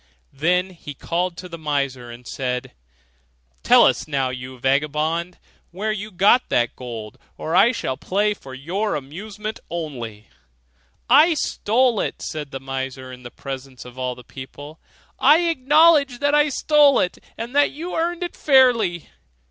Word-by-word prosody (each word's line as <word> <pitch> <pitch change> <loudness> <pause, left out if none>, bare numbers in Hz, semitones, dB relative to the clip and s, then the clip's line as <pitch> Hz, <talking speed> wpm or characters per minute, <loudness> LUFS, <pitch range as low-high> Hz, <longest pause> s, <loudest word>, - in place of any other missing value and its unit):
Then 180 +6 +1
he 150 -5 -10
called 175 +4 -2
to 180 - -8
the 165 -1 -9
miser, 140 -5 -2
and 120 +1 -11
said, 125 -1 -4 0.9
'Tell - - +6
us - - +1
now, 135 -3 -1
you 130 +1 -8
vagabond, 150 +6 0 0.3
where 205 +5 -3
you 210 0 -4
got 205 +6 +3
that 120 -1 +1
gold, 115 -4 -8 0.2
or 160 - -3
I 230 +6 +6
shall 130 - -3
play 200 +8 0
on - - 0
for 130 -1 -9
your 185 +10 -2
amusement 200 +10 -6
only,' 120 -11 -6 0.8
'I 305 +6 +6
stole 240 -3 +1
it,' - - -3
said 150 -2 -5
the 135 - -6
miser 130 -1 -5
in 125 0 -11
the 120 - -9
presence 135 -1 -8
of 125 +1 -12
all 125 -1 -2
the 125 - -13
people; 145 +5 -11 0.4
'I 300 +5 +6
acknowledge 300 -3 +4
that 285 +2 +1
I 295 0 +4
stole 290 0 +4
it, 180 - -1 0.2
and 235 +4 -6
that 290 0 +4
you 335 +5 -7
earned 345 +2 -1
it 350 - -5
fairly. 240 - +3
170 Hz, 160 wpm, -22 LUFS, -, 0.9 s, Tell